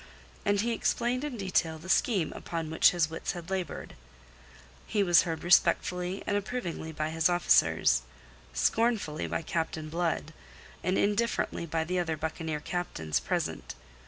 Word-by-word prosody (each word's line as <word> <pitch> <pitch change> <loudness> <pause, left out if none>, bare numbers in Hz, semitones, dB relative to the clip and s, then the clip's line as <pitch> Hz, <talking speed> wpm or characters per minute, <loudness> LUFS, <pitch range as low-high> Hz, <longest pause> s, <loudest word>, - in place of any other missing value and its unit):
And 205 0 +3
he 235 +2 0
explained 245 +3 0
in 290 -5 -4
detail 180 -5 0
the 160 +4 -12
scheme 190 -3 +2
upon 165 -2 -4
which 160 - +6
his 175 -3 +1
wits 165 - -3
had 175 +1 -8
laboured. 185 -5 -4 0.9
He 210 -2 +1
was 175 -3 +6
heard 165 -2 -4
respectfully 180 +1 +2
and 205 - 0
approvingly 195 -6 -3
by 155 0 -2
his 160 +1 +2
officers, 175 - +4 0.5
scornfully 200 - +1
by - - -2
Captain 160 -1 -3
Blood, 165 -2 -1 0.5
and 185 +2 +1
indifferently 205 -4 0
by 160 0 0
the 180 +3 -1
other 160 -3 -1
buccaneer 160 0 -3
captains 80 - -2
present. - - -3
175 Hz, 145 wpm, -29 LUFS, 160-195 Hz, 0.9 s, which